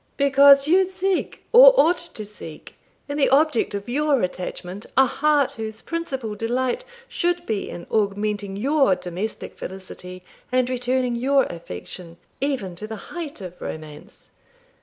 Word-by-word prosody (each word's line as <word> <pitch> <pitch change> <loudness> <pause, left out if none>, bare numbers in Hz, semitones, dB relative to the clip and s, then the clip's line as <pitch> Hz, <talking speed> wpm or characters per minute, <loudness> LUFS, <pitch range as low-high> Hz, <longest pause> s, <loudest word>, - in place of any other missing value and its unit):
'Because 280 0 +6
you 370 +3 +4
seek, 380 0 -2
or - - +9
ought 340 +3 +5
to 340 -12 -6
seek, 165 -7 -10 0.3
in 285 0 -4
the 285 - +3
object 275 -6 +2
of 200 0 -5
your 280 0 +1
attachment 180 +2 -5
a 265 - +7
heart 290 +1 +2
whose 220 -1 -7
principal 265 -10 -4
delight 245 - -1 0.2
should 350 -5 -1
be 215 -3 -2
in 175 - -8
augmenting 205 -1 -1
your 270 -1 +3
domestic 180 +6 -5
felicity 185 -1 -9 0.3
and 255 0 +1
returning 250 0 0
your 270 +3 +3
affection, 170 - -9 0.2
even 260 -11 -2
to 215 - -5
the 220 - -6 0.2
height 315 - -6
of 180 -1 -9
romance. 155 -1 -9
245 Hz, 140 wpm, -23 LUFS, 200-290 Hz, 0.3 s, or